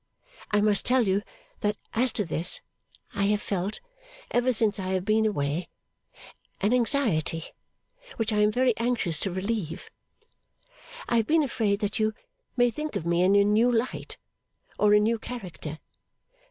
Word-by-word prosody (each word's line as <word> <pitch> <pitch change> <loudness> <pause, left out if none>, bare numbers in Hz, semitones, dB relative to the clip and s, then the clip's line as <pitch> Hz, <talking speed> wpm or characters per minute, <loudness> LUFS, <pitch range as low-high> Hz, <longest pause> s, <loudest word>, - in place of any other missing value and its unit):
I 210 0 +2
must 210 -1 +3
tell 250 -3 +2
you 190 +2 +2 0.4
that 210 -1 -1 0.2
as 245 +2 +2
to 210 - 0
this, 165 +1 +1 0.5
I 200 -1 0
have 210 +1 +2
felt, 195 0 -3 0.5
ever 245 +1 +2
since 215 -3 +1
I 185 - -3
have 185 0 -1
been 220 +1 +3
away, 150 -3 -2 0.9
an 205 +4 +1
anxiety 225 - +1 0.7
which 225 -1 -1
I 210 - +1
am 210 0 +4
very 250 0 +2
anxious 225 -9 0
to 195 - -1
relieve. 185 -3 -3 1.2
I 235 - +2
have 225 - +1
been 320 0 +4
afraid 215 -6 0
that 205 +2 -1
you 215 0 +1 0.4
may 245 0 +4
think 300 +6 -5
of 160 - -3
me 170 +1 +2
in 190 +2 +4
a 200 - +6
new 215 +4 +3
light, 240 +2 -2 0.6
or 210 0 +5
a - - +6
new 225 +2 +1
character. 180 -11 -7
210 Hz, 160 wpm, -27 LUFS, 190-235 Hz, 1.2 s, a